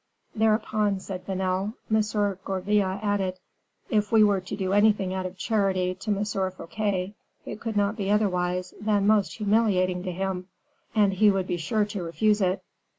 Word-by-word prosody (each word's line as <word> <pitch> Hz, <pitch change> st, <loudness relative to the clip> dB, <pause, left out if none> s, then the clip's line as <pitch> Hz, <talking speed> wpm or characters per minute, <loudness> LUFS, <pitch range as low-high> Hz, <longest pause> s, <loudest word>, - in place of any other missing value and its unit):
"Thereupon," 215 Hz, -2 st, +1 dB
said 190 Hz, -1 st, -7 dB
Vanel, 190 Hz, +2 st, -1 dB, 0.2 s
"M. 210 Hz, -2 st, +1 dB
Gourville 195 Hz, 0 st, 0 dB
added, 195 Hz, -3 st, 0 dB, 0.5 s
'If 210 Hz, -2 st, +1 dB
we 220 Hz, -1 st, +6 dB
were 200 Hz, -2 st, +3 dB
to 185 Hz, +2 st, -6 dB
do 190 Hz, -1 st, -2 dB
anything 205 Hz, -2 st, +3 dB
out 185 Hz, -1 st, -2 dB
of 185 Hz, +1 st, -11 dB
charity 190 Hz, -3 st, 0 dB
to 190 Hz, +4 st, -8 dB
M. 205 Hz, 0 st, +1 dB
Fouquet, 195 Hz, 0 st, -2 dB, 0.3 s
it -, -, -6 dB
could 225 Hz, -2 st, -3 dB
not 205 Hz, +2 st, +1 dB
be 200 Hz, -2 st, -2 dB
otherwise 180 Hz, -3 st, 0 dB
than 205 Hz, -1 st, +1 dB
most 205 Hz, -6 st, +3 dB
humiliating 200 Hz, -4 st, +2 dB
to 185 Hz, 0 st, -4 dB
him; 185 Hz, 0 st, -3 dB, 0.5 s
and 205 Hz, -2 st, +4 dB
he 210 Hz, +2 st, +5 dB
would 195 Hz, -2 st, +1 dB
be 175 Hz, -, -2 dB
sure 205 Hz, +6 st, 0 dB
to 205 Hz, -2 st, -5 dB
refuse 210 Hz, +5 st, +1 dB
it. 185 Hz, 0 st, 0 dB
200 Hz, 165 wpm, -26 LUFS, 185-210 Hz, 0.5 s, we